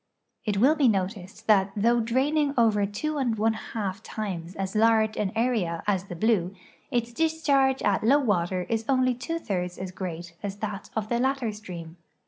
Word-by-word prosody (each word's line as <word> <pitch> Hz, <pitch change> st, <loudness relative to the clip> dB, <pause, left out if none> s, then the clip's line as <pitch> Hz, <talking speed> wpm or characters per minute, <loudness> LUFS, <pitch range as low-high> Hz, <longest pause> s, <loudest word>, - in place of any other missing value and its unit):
It 205 Hz, -2 st, 0 dB
will 260 Hz, +9 st, +5 dB
be 295 Hz, -4 st, +3 dB
noticed 195 Hz, 0 st, -2 dB
that 200 Hz, -3 st, +4 dB
though 235 Hz, +3 st, +3 dB
draining 280 Hz, +5 st, +1 dB
over 210 Hz, -4 st, +3 dB
two 295 Hz, +9 st, -3 dB
and 240 Hz, -5 st, 0 dB
one 220 Hz, +1 st, +2 dB
half 210 Hz, -2 st, -4 dB
times 185 Hz, -6 st, -5 dB
as 195 Hz, +1 st, -4 dB
large 220 Hz, 0 st, +4 dB
an 200 Hz, -3 st, -1 dB
area 220 Hz, -8 st, 0 dB
as 195 Hz, -3 st, 0 dB
the 180 Hz, -, -7 dB
Blue, 195 Hz, -2 st, +1 dB, 0.3 s
its 240 Hz, -2 st, -1 dB
discharge 280 Hz, -3 st, +2 dB
at 200 Hz, 0 st, +2 dB
low 265 Hz, +6 st, +5 dB
water 185 Hz, -8 st, 0 dB
is 225 Hz, -1 st, -1 dB
only 255 Hz, -1 st, +3 dB
two 330 Hz, +7 st, -4 dB
thirds 180 Hz, -, -3 dB
as 185 Hz, -1 st, -5 dB
great 175 Hz, -2 st, -6 dB
as 200 Hz, -1 st, -4 dB
that 205 Hz, -1 st, -5 dB
of 215 Hz, -1 st, -2 dB
the 235 Hz, -, +1 dB
latter 265 Hz, -3 st, 0 dB
stream. 175 Hz, -5 st, -9 dB
215 Hz, 180 wpm, -26 LUFS, 190-245 Hz, 0.3 s, will